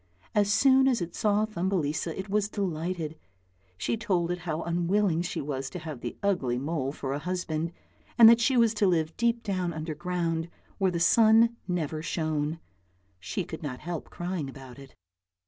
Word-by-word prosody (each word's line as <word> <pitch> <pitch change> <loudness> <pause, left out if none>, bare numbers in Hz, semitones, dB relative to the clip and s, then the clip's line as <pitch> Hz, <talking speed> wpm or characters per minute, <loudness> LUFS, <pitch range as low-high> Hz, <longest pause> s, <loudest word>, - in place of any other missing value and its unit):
As 205 -1 +3
soon 265 +5 +5
as 255 -3 +2
it 175 -1 -4
saw 210 0 +2
Thumbelisa 170 -6 -2
it 190 - -5
was 205 +1 0
delighted; 170 -5 -3 0.6
she 230 - -1
told 185 -6 0
it 175 - -2
how 155 +1 -1
unwilling 175 +1 +1
she 180 - -3
was 135 -1 -4
to 180 - -7
have 155 -6 -7
the 120 - -5
ugly 155 -12 +1
mole 135 0 -2
for 135 -2 -4
a 140 - -2
husband, 165 -1 -2 0.5
and 230 - +10
that 230 +1 +7
she 255 +2 +3
was 230 -2 +4
to 210 -2 +2
live 160 -3 +1
deep 235 0 +1
down 185 -4 -1
underground 165 +1 -2 0.3
where 190 -1 +3
the 175 -2 -2
sun 225 +5 +5
never 160 -4 -2
shone. 155 -1 -2 0.6
She 185 - -3
could 160 -1 -8
not 140 -5 -5
help 170 -1 -5
crying 175 -5 -4
about 135 -1 -11
it. 135 -1 -14
175 Hz, 175 wpm, -28 LUFS, 155-205 Hz, 0.6 s, and